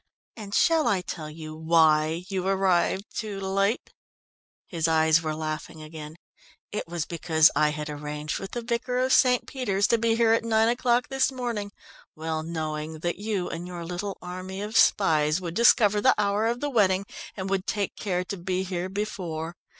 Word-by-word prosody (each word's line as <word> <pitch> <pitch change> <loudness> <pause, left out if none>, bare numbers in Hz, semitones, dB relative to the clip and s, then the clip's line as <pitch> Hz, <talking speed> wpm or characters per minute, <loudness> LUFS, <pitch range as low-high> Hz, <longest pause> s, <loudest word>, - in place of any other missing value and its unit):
And 205 -3 -6
shall 325 -6 +3
I 200 -5 +2
tell 155 -3 -6
you 155 0 -8
why 160 +1 +3
you 190 -1 -2
arrived 190 0 +2
too 210 -3 -4
late?" 195 +4 0 0.7
His 165 -3 -1
eyes 160 0 +4
were 155 -1 -3
laughing 155 0 -5
again. 155 0 -9 0.6
"It 210 - -4
was 170 -1 -3
because 160 -2 +3
I 150 +1 +3
had 150 0 -4
arranged 150 0 -4
with 195 - -8
the 240 - -3
vicar 240 +2 -2
of 255 +1 +2
St. 250 -2 +4
Peter's 205 -7 -1
to 235 - +3
be 225 0 +2
here 230 -1 +4
at 225 - +1
nine 225 0 +3
o'clock 245 0 +1
this 270 0 +1
morning, 235 -6 -4 0.4
well 160 0 -3
knowing 155 -1 -4
that 175 +2 -2
you 205 -4 -2
and 170 +2 -6
your 175 -1 -6
little 180 +3 -4
army 185 +2 -6
of 215 +2 -6
spies 155 -7 +4
would 175 -3 -5
discover 210 -1 +4
the - - +5
hour 205 +2 +1
of 240 +1 -2
the 290 - -1
wedding, 195 -5 +2 0.3
and 190 -1 -3
would 195 0 -1
take 205 -2 -2
care 180 -3 -2
to 195 +2 -6
be 185 +1 -2
here 185 -1 -3
before. 180 -5 -4
185 Hz, 180 wpm, -26 LUFS, 160-215 Hz, 0.7 s, the